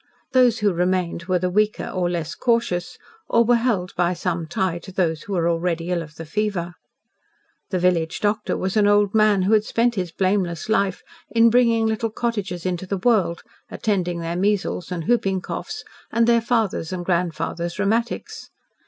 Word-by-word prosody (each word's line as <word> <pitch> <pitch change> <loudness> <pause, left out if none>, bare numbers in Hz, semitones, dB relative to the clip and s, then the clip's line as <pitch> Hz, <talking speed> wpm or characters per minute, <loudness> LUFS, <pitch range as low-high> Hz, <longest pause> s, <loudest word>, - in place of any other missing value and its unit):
Those 250 -4 +4
who 205 -2 +3
remained 180 -1 -1
were 185 0 +1
the 180 +1 -1
weaker 210 +2 +1
or 180 -2 -1
less 170 -2 -3
cautious, 230 -7 0 0.3
or 230 - +4
were 240 +1 +4
held 225 -7 -1
by 175 0 +1
some 170 -2 -2
tie 175 +1 -1
to 190 - -11
those 165 -4 0
who 200 - -6
were 170 -2 +1
already 170 0 -1
ill 175 -1 0
of 150 -2 -10
the 165 - -8
fever. 175 -1 -2 1.0
The 185 - -1
village 175 -3 +1
doctor 210 +1 0
was 190 +2 -2
an 210 -1 +4
old 205 -1 +3
man 215 -3 +4
who 200 +4 +2
had 215 -1 +4
spent 235 +2 +1
his 180 -5 -3
blameless 185 -1 -1
life 200 -4 +1 0.3
in 230 0 +4
bringing 230 -2 +3
little 220 +1 0
cottagers 205 -6 -3
into 185 0 -2
the 195 - -1
world, 190 -5 +1 0.3
attending 180 -5 -1
their 165 +1 -3
measles 195 -2 -1
and 175 -2 -3
whooping 195 -6 +1
coughs, - - -6 0.3
and 230 0 +3
their 235 0 +4
father's 225 -8 0
and 180 -1 -4
grandfather's 170 -1 -1
rheumatics. 230 - -2
190 Hz, 180 wpm, -22 LUFS, 175-220 Hz, 1.0 s, Those